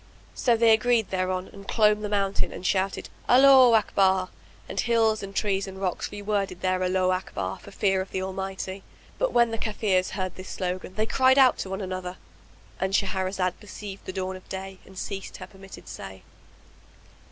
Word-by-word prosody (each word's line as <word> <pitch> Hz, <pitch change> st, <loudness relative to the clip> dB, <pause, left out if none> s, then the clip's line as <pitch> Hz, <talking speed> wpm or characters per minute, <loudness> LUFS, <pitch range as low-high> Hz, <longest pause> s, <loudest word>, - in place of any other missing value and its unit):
So 240 Hz, -3 st, +2 dB
they 230 Hz, 0 st, +5 dB
agreed 225 Hz, 0 st, +3 dB
thereon 185 Hz, 0 st, -2 dB
and 200 Hz, 0 st, -12 dB
clomb 210 Hz, -1 st, +3 dB
the 210 Hz, -, -3 dB
mountain 200 Hz, -1 st, 0 dB
and 180 Hz, -, -8 dB
shouted, 190 Hz, +1 st, 0 dB, 0.2 s
"Allaho 260 Hz, -2 st, +8 dB
Akbar!" 190 Hz, -3 st, +2 dB, 0.4 s
And -, -, -4 dB
hills 225 Hz, -2 st, +2 dB
and 195 Hz, 0 st, -8 dB
trees 200 Hz, -2 st, 0 dB
and 190 Hz, 0 st, -8 dB
rocks 185 Hz, -2 st, -2 dB
reworded 205 Hz, -3 st, -2 dB
their 185 Hz, 0 st, +1 dB
Allaho 185 Hz, 0 st, +1 dB
Akbar 140 Hz, -, -4 dB
for -, -, -13 dB
fear 195 Hz, -1 st, +1 dB
of 190 Hz, -, -6 dB
the 190 Hz, -, -3 dB
Almighty. 190 Hz, 0 st, -5 dB, 0.4 s
But -, -, +1 dB
when 235 Hz, -1 st, +3 dB
the 225 Hz, -, -3 dB
Kafirs 205 Hz, -4 st, 0 dB
heard 185 Hz, -2 st, -3 dB
this 185 Hz, 0 st, -8 dB
slogan 185 Hz, 0 st, -4 dB
they 215 Hz, -, +1 dB
cried 260 Hz, +3 st, +4 dB
out 260 Hz, -2 st, +6 dB
to 190 Hz, -, -4 dB
one 190 Hz, +1 st, -4 dB
another,—And 180 Hz, -, -7 dB
Shahrazad 190 Hz, -2 st, -1 dB
perceived 205 Hz, -1 st, -9 dB
the -, -, -3 dB
dawn 190 Hz, 0 st, -3 dB
of 185 Hz, -, -13 dB
day 190 Hz, 0 st, -6 dB
and 190 Hz, -, -14 dB
ceased 195 Hz, 0 st, -5 dB
to -, -, -7 dB
say -, -, -8 dB
her -, -, -23 dB
permitted 195 Hz, 0 st, -13 dB
say. 95 Hz, -1 st, -9 dB
195 Hz, 185 wpm, -26 LUFS, 185-210 Hz, 0.4 s, Allaho